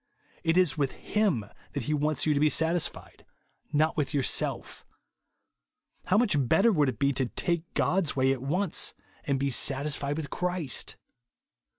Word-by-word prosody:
It 165 0 +2
is 180 -5 +4
v/ith 140 -3 -1 0.2
Hiifn 180 - +1 0.2
that 140 - -3
he 150 - -1
wants 150 +1 +1
you 155 - +3
to 140 - +1
be 155 +1 +4
satisfied, 165 +2 -1 0.5
not 155 +2 +2
with 150 -2 -1
yourself 135 -3 0 1.2
How 190 - +2
much 230 -3 +3
better 195 - +3
would 150 -8 +2
it 120 - -5
be 140 0 +1
to 130 -1 0
take 170 +5 -2
God's 180 -5 +1
way 135 0 +3
at 130 - -6
once, 170 +7 0 0.3
and 140 -2 0
be 140 0 0
satisfied 140 +2 -1
with 155 -3 -5
Christ 180 -8 -2
150 Hz, 160 wpm, -28 LUFS, 140-170 Hz, 1.2 s, is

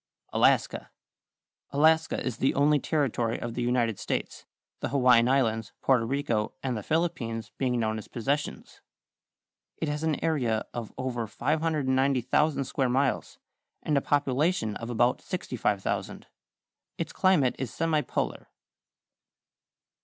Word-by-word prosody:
=Alaska.= - - +2 0.8
Alaska 160 +3 +3
is 115 - -2
the 135 - +1
only 145 +1 +4
territory 125 -7 0
of 120 -1 -4
the 125 - -3
United 120 -3 +1
States, - - -4 0.3
the - - -2
Hawaiian 125 -3 +5
Islands, 115 -5 +1
Porto 125 -4 +2
Rico, 120 -5 -1
and 130 -2 -1
the 105 - -3
Philippines 115 - -2
being 125 -2 +1
known 110 -1 -1
as - - -11
Possessions. 140 +5 -3 1.0
It 160 - -2
has 150 0 -2
an 160 -2 0
area 125 -9 0
of 115 -3 -5
over 120 -3 -3
590,000 140 0 +1
square 130 0 -1
miles, 135 +1 0 0.5
and 150 - 0
a 140 - +3
population 140 - +1
of 115 - -7
about 120 +1 +2
65,000. 120 - -2 0.7
Its - - -4
climate 180 -10 +3
is 130 -2 -2
semipolar. 155 +1 -1
130 Hz, 125 wpm, -28 LUFS, 115-150 Hz, 1.0 s, Hawaiian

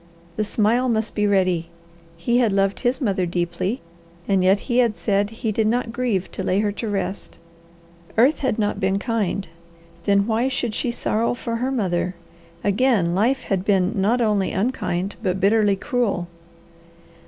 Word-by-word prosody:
The 215 - 0
smile 225 +4 +1
must 220 -1 0
be 210 -1 +1
ready. 185 -4 +1 0.5
He 235 +9 +1
had 235 -4 +3
loved 195 0 +1
his 255 +1 0
mother 195 -8 0
deeply, 175 +6 -2 0.5
and 195 -2 +2
yet 195 +2 +4
he 245 -1 0
had 235 -4 +2
said 200 -1 +1
he 225 0 -3
did 215 +1 +1
not 230 0 0
grieve 230 -7 -1
to - - -5
lay 185 - +1
her 210 -1 0
to 215 +2 -4
rest. 195 -1 -4 0.8
Earth 260 +7 +4
had 260 -5 0
not 210 -2 0
been 190 +1 +1
kind. 200 -3 -1 0.6
Then 200 0 +3
why 230 +3 +1
should 250 -4 -2
she 240 - -1
sorrow 235 0 0
for 230 -1 -3
her 250 +3 -1
mother? 185 -7 -1 0.5
Again 205 -4 +2
life 235 +8 +1
had 190 -2 -1
been 190 -2 +2
not 220 +4 +1
only 210 -4 +1
unkind, 195 -4 -2
but 190 -3 -1
bitterly 205 0 +3
cruel. 210 -5 -1
210 Hz, 165 wpm, -22 LUFS, 190-235 Hz, 0.8 s, yet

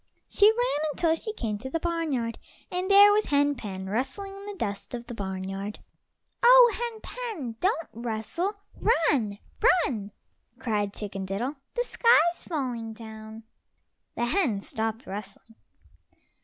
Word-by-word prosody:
She 410 - +5
ran 440 -10 +1
until 320 +2 +2
she 380 +7 -3
came 220 - -3
to 265 +4 -6
the 330 - -1
barnyard, 310 -9 -2 0.3
and 365 +2 -2
there 405 +1 +9
was 420 +1 +2
Hen 285 0 +3
pen 195 -7 -6
rustling 270 - -3
in 395 0 -10
the 410 - -5
dust 205 - -4
of 235 0 -7
the 240 - -7
barnyard. 195 0 -4 0.6
"Oh, 485 -1 +8
Hen 465 -1 -4
pen, 410 - -5
don't 360 -3 0
rustle—run, 270 - -1 0.5
run!" 210 -6 -4 0.5
cried 210 -5 -1
Chicken 195 -2 -5
diddle. 240 +10 -3 0.2
"The 485 - +1
sky's 350 -9 +3
falling 245 -8 -3
down." 220 0 -10 0.7
The 240 - 0
hen 250 - +1
stopped 220 +3 -3
rustling. 205 +3 -8
260 Hz, 135 wpm, -27 LUFS, -, 0.7 s, there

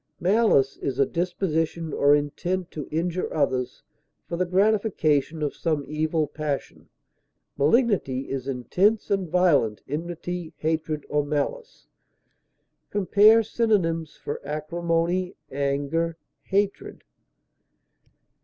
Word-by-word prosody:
Malice 180 - +3
is 130 -2 -3
a 140 - +4
disposition 165 -2 -2
or 145 +1 +5
intent 175 +5 -2
to 150 -3 -6
injure 170 +3 -2
others, 130 -4 -1 0.4
for - - -3
the 180 +1 0
gratification 180 -6 +1
of 145 - -2
some 155 -4 -1
evil 155 +1 0
passion; 145 -1 -5 0.7
malignity 150 - +2
is 135 -1 -5
intense 185 - +1
and 195 -4 0
violent 155 - +2
enmity, 170 +2 -5
hatred, 155 -1 -2
or 150 0 +1
malice. 150 - -3 1.0
Compare 210 +3 +5
synonyms 185 -8 0
for 145 - -6
ACRIMONY; 170 +4 -1 0.2
ANGER; 145 +4 -1 0.3
HATRED. 200 +1 -1
165 Hz, 100 wpm, -25 LUFS, 145-185 Hz, 1.0 s, or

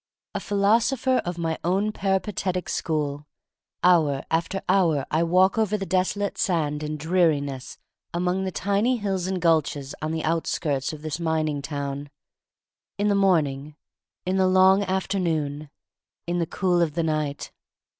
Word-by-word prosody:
A - - -2
philosopher 230 +6 +2
of 175 0 -3
my 165 -1 -2
own 195 +5 +1
peripatetic 190 -2 -1
school 150 -2 -2 0.3
— - - -59
hour 155 -6 +4
after 170 +4 -1
hour 170 -7 +3
I 155 - +2
walk 185 +5 +3
over 210 -1 +1
the 195 - -4
desolate 190 +2 -1
sand 150 -5 0
and 155 0 -3
dreariness 150 -5 0 0.3
among 180 +2 -1
tiny 205 +7 +1
hills 195 -4 -2
and 190 -1 -1
gulches 155 -4 +1
on 155 +1 -2
the 160 -1 -2
outskirts 155 -4 -1
of 155 -1 -9
this 155 +1 -3
mining 155 -3 0
town; 140 0 -4 0.9
in 205 +1 +1
the - - +3
morning, 155 -7 +1 0.5
in 185 +1 0
the 190 -1 +3
long 190 +1 +5
afternoon, 165 -6 -1 0.6
in 175 +1 -1
the 165 - 0
cool 180 -1 +1
of 155 -3 0
the 170 - +1
night. 155 -2 -2
170 Hz, 145 wpm, -25 LUFS, 150-190 Hz, 0.9 s, long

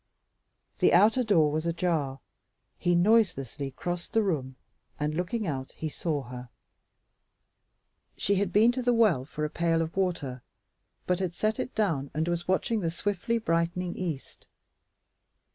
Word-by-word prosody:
The - - +4
outer 220 +7 +5
door 165 -9 +3
was 155 +2 -1
ajar; 165 -6 -1 0.6
he 175 -1 +2
noiselessly 175 - +2
crossed 175 +6 -5
the 225 - +3
room, 135 -9 -2 0.4
and 150 +1 -1
looking 180 +7 -2
out, 135 -5 -4
he 160 - -4
saw 150 -2 -2
her. 125 0 -9 1.7
She 200 - +1
had 195 -1 0
been 220 +5 +5
to 255 +1 -3
the 245 -1 +2
well 200 - +3
for 150 +1 -3
a - - -2
pail 165 -1 +1
of 165 0 -2
water, 165 -10 -1 0.6
but 180 0 +1
had 180 -3 -2
set 215 0 0
it - - -4
down 165 -11 0
and 160 +2 0
was 175 0 -2
watching 215 +4 +1
the 170 -4 -1
swiftly 205 +6 -1
brightening 175 -2 -1
east. 165 -7 -5
175 Hz, 150 wpm, -28 LUFS, 150-200 Hz, 1.7 s, outer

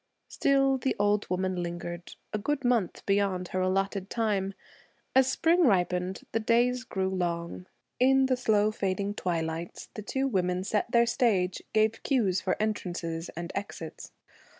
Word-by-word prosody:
Still 270 -1 +2
the 265 - 0
old 205 0 +1
woman 185 0 -1
lingered, 175 0 -6 0.2
a 215 - 0
good 275 +5 -2
month 235 -7 +1
beyond 195 -3 +1
her 185 - -1
allotted 195 +1 0
time. 200 -4 -1 0.6
As 265 0 +5
spring 340 +5 +3
ripened, 180 -2 +1
the 225 - +1
days 240 +3 +2
grew 190 -6 -2
long. 175 -1 -3 0.3
In 265 +1 +5
the 260 -1 +2
slow 215 -4 +2
fading 200 0 -2
twilights, 165 -3 -3
the 215 - -6
two 265 +6 -1
women 180 -5 0
set 210 +3 -1
their 235 -1 +4
stage, 200 -7 +1
gave 220 +1 +2
cues 205 -9 +1
for 185 - 0
entrances 175 -6 -3
and 170 0 -4
exits. 200 +1 -6
200 Hz, 150 wpm, -28 LUFS, 180-235 Hz, 0.6 s, As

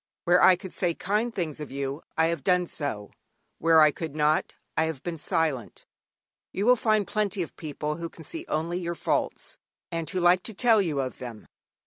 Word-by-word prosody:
Where 175 0 +4
I 185 - +8
could 185 0 -9
say 175 -3 0
kind 210 +5 0
things 165 -8 -3
of 150 - -6
you 140 +2 -3 0.2
I 160 - +4
have 170 0 -1
done 180 -1 +3
so, 125 -11 -4 0.5
where 165 -1 +5
I 155 -1 +7
could 155 -1 -6
not 150 0 +1 0.2
I 160 - +2
have 160 -5 -4
been 170 -2 -4
silent. 155 - -1 0.7
You 200 - -2
will 250 +1 +7
find 215 -3 +2
plenty 205 -3 0
of 165 - -9
people 150 0 -4
who 170 0 -5
can 165 - -13
see 330 - -6
only 170 +3 -1
your 170 -1 -3
faults, - - -2 0.3
and 165 -1 -3
who 185 - -1
like 175 +1 +5
to 220 - -7
tell 225 -1 +5
you 155 -7 -1
of 130 -1 -5
them. 120 -4 -8
170 Hz, 200 wpm, -27 LUFS, 150-185 Hz, 0.7 s, I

